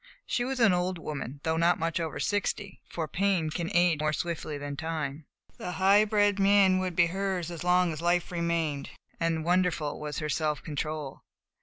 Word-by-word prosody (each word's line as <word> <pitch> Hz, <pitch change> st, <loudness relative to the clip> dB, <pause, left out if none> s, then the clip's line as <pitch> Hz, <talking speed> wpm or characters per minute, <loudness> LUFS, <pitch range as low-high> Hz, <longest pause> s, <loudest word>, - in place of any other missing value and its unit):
She 240 Hz, -, 0 dB
was 260 Hz, +1 st, -3 dB
an 225 Hz, -5 st, +5 dB
old 180 Hz, +1 st, 0 dB
woman, 145 Hz, -3 st, -6 dB
though 160 Hz, 0 st, 0 dB
not 170 Hz, +2 st, +3 dB
much 165 Hz, +1 st, -1 dB
over 165 Hz, -2 st, -3 dB
sixty, 205 Hz, -1 st, -2 dB
for 165 Hz, -2 st, -3 dB
pain 185 Hz, -3 st, 0 dB
can 170 Hz, +1 st, -3 dB
age 175 Hz, -3 st, +3 dB
more 155 Hz, 0 st, +1 dB
swiftly 155 Hz, -3 st, -3 dB
than 145 Hz, 0 st, -5 dB
time. 155 Hz, -2 st, -4 dB, 0.3 s
The 180 Hz, -, -4 dB
high 200 Hz, +3 st, +5 dB
bred 205 Hz, -1 st, +2 dB
mien 195 Hz, -1 st, +5 dB
would 185 Hz, -2 st, -2 dB
be 170 Hz, -, +5 dB
hers 185 Hz, -1 st, -2 dB
as 170 Hz, 0 st, -6 dB
long 180 Hz, -1 st, +3 dB
as 155 Hz, -, -7 dB
life 175 Hz, +1 st, +1 dB
remained, 170 Hz, -4 st, -1 dB, 0.3 s
and 165 Hz, -1 st, 0 dB
wonderful 175 Hz, -4 st, +1 dB
was 150 Hz, -1 st, -5 dB
her 155 Hz, -, -2 dB
self 150 Hz, -1 st, -1 dB
control. 150 Hz, -2 st, -4 dB
170 Hz, 185 wpm, -28 LUFS, 155-185 Hz, 0.3 s, an